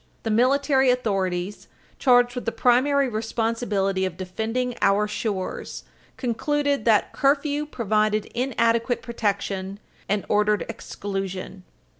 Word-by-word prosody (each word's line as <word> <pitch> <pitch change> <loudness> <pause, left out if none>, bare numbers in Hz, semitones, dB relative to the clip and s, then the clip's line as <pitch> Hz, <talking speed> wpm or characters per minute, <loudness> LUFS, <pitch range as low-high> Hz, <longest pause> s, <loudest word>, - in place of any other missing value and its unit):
The 225 - -1
military 265 +3 +3
authorities, 195 -6 -1 0.3
charged 245 -2 +4
with 250 - -5
the 230 - 0
primary 270 +4 +3
responsibility 220 -4 -1
of 185 -3 -3
defending 225 +7 -2
our 205 +2 +3
shores, 205 -3 -4 0.3
concluded 285 +3 0
that 220 -3 +3
curfew 290 +1 +1
provided 215 -4 0
inadequate 235 -1 +1
protection 200 -4 -2 0.3
and 205 0 0
ordered 210 0 +2
exclusion. 195 -4 -5
225 Hz, 105 wpm, -24 LUFS, 200-250 Hz, 0.3 s, charged